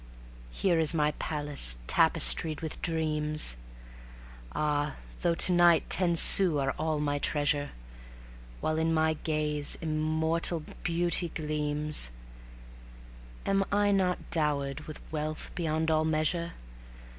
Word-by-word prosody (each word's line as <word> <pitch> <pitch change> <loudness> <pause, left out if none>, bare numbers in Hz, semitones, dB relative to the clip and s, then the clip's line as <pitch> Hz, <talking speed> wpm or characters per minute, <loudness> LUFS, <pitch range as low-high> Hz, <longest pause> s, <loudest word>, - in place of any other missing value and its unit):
Here 170 - 0
is 160 0 +1
my 150 -1 +1
Palace 145 - +1
tapestried 65 - +3
with 160 -1 -6
dreams. 155 - -1 1.0
Ah! 150 -1 -1 0.3
though 170 -1 +1
to 180 - +6
night 175 -2 +3
ten 175 -2 +3
sous 170 -2 +6
are 135 0 -1
all 155 -1 -1
my 145 -1 -1
treasure, 145 -1 -1 0.9
While 155 0 -1
in 165 0 0
my 160 0 +2
gaze 150 -2 -1
immortal 160 +1 -1 0.2
beauty 175 0 +1
gleams, 150 - -2 1.4
Am 195 0 +1
I 205 0 +2
not 185 -2 +1
dowered 150 -2 -2
with 155 - -9
wealth 155 0 -5
beyond 160 -2 -1
all 155 0 +2
measure? 160 +2 -1
155 Hz, 115 wpm, -28 LUFS, 150-165 Hz, 1.4 s, to